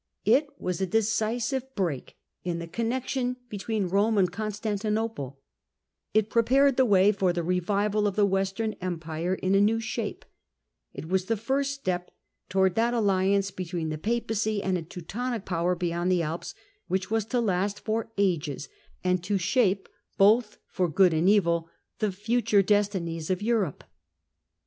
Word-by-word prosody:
ItJSLas 245 - +1
a 190 - +1
decisive 230 +5 0
break 170 - -3 0.3
in 175 -1 -2
the 170 - -5
connexion 250 +6 -2
between 210 -1 -2
Rome 205 +4 +2
and 185 -3 +3
Constantinople; 210 - -3 0.7
it 215 0 +1
prepared 265 +4 +4
the 260 -1 +4
way 200 -1 +5
for 190 -3 +1
the 175 -1 -2
revival 200 +4 +1
of 200 - -2
the 210 - +4
Western 195 +3 0
Empire 170 0 -2
in 190 0 -1
a 195 - +5
new 220 +2 +3
shape, 225 - -4 0.7
it 155 - -8
was 185 +1 0
the 225 +2 0
first 275 +5 -1
step 180 -9 -3 0.4
towards 190 -1 +3
that 235 +3 +1
alliance 195 -2 +2
between 175 -3 -4
the 155 - -3
Papacy 220 -1 -1
and 190 -1 +1
a 175 - -1
Teutonic 210 +8 -5
power 175 0 0
beyond 175 +1 -1
the 180 -2 +2
Alps 160 +2 -4 0.3
which 190 +2 -2
was 225 -2 +1
to 245 +2 0
last 200 -2 0
for 225 0 -2
ages, 150 -8 0 0.3
and 180 -1 +1
to 200 +2 0
shape 195 0 +1 0.3
both 210 +2 +4
for 180 -2 -1
good 180 +2 +4
and 160 +4 +3
evil 170 -5 +2 0.3
the 215 -2 +1
future 210 +1 +2
destinies 190 -6 0
of 185 +2 -1
Europe. 215 - 0
200 Hz, 155 wpm, -27 LUFS, 180-225 Hz, 0.7 s, way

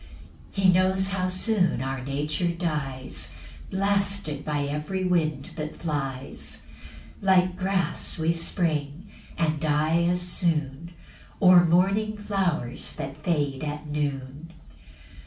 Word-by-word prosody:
8 - - +1
He 185 -1 +7
knows 190 +1 +3
how 185 -2 0
soon 185 +1 +1
our 135 -1 -3
nature 150 +5 -1
dies, 150 -7 -3 0.3
Blasted 195 -6 0
by 150 -2 -1
every 150 +7 -2
wind 155 -6 0
that 155 0 -4
flies; 135 -4 -4 0.6
Like 185 -2 +4
grass 190 0 0
we 160 0 +2
spring, 165 0 -2 0.3
and 155 -2 +1
die 155 +2 +2
as 180 +1 +2
soon, 165 -2 -1 0.4
Or 180 -2 +8
morning 195 +5 +2
flowers 195 -11 -1
that 135 +1 -5
fade 145 -5 0
at 150 0 -4
noon. 145 +1 -4
165 Hz, 115 wpm, -26 LUFS, 145-185 Hz, 0.6 s, Or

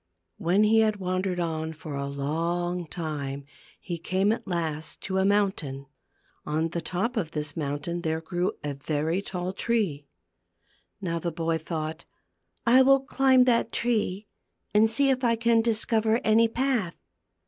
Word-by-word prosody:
When 185 +5 +3
he 220 +1 +5
had 215 -1 +3
wandered 185 -1 -2
on 160 -1 -2
for 155 -1 -8
a 140 0 -3
long 170 +5 -2
time 145 -4 -4 0.3
he 175 -3 -5
came 190 +5 +1
at 225 - -3
last 160 -3 -3
to 190 0 -1
a 190 - +2
mountain. 190 -10 0 0.6
On 155 +2 -1
the 170 +1 -3
top 205 +10 -2
of 165 -7 -2
this 150 -1 -2
mountain 155 +3 -3
there 160 -1 -1
grew 175 +2 -2
a 145 -1 -2
very 155 +5 -1
tall 180 -2 -4
tree. 195 -11 -1 0.9
Now 170 -3 -2
the 170 +1 -2
boy 165 0 -1
thought: 160 0 -5 0.3
" - - -49
I 245 +3 +7
will 270 +1 +5
climb 265 -2 +4
that 235 -2 +2
tree 215 -4 0 0.5
and 215 +1 +5
see 270 +5 +4
if 260 0 -1
I 230 -1 +3
can 230 0 +3
discover 225 0 +1
any 225 +1 +5
path." 235 -7 0
180 Hz, 160 wpm, -27 LUFS, 160-220 Hz, 0.9 s, I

